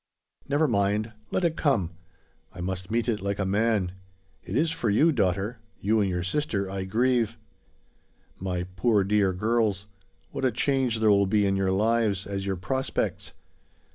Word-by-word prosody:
Never 145 +2 +3
mind! 105 -1 +1 0.2
Let 185 - -1
it 165 -2 +1
come! 115 - +1 0.6
I 90 - -13
must 90 +1 -4
meet 115 +2 0
it 110 -4 0
like 100 0 -2
a 95 - -1
man. 100 -1 +1 0.5
It 95 - -6
is 155 +4 +2
for 115 - -1
you, 150 +11 +4
daughter 100 - 0 0.2
you 110 +2 +2
and 100 - +1
your 90 -1 -1
sister 100 -2 -1
I 95 0 -4
grieve. 120 +3 +1 1.0
My 90 -1 -2
poor 105 +2 +3
dear 100 -1 +2
girls; 105 0 0 0.5
what - - -5
a 130 - +3
change 125 -1 0
there 110 -1 +5
will 100 -1 +4
be 105 +1 +2
in 100 0 +2
your 95 -1 +1
lives, 105 -1 +1
as 100 -1 -4
your 95 - 0
prospects! 130 +9 -2
105 Hz, 170 wpm, -26 LUFS, 95-120 Hz, 1.0 s, there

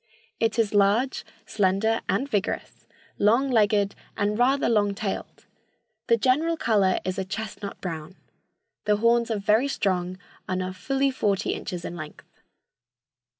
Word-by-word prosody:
It 225 -1 +1
is 220 -3 +1
large, 205 +6 +2 0.2
slender 205 +3 +1
and 225 +9 +1
vigorous, 205 -6 -3 0.3
long 235 +7 +3
legged 210 -3 +3 0.2
and 205 +1 +1
rather 270 +3 +3
long 205 -3 +2
tailed. 200 -1 -5 0.6
The 230 - +4
general 300 +8 +2
color 205 -8 +2
is 185 +1 -2
a - - 0
chestnut 210 0 -6
brown. 165 0 -6 0.7
The 210 - +3
horns 235 +1 +3
are 220 - 0
very 215 +6 +2
strong 185 -7 -1 0.3
and 185 0 -1
are 185 0 -4
fully 270 +8 0
forty 205 -7 0
inches 180 -1 -5
in 175 - -5
length. 155 -3 -11
210 Hz, 140 wpm, -25 LUFS, 190-235 Hz, 0.7 s, The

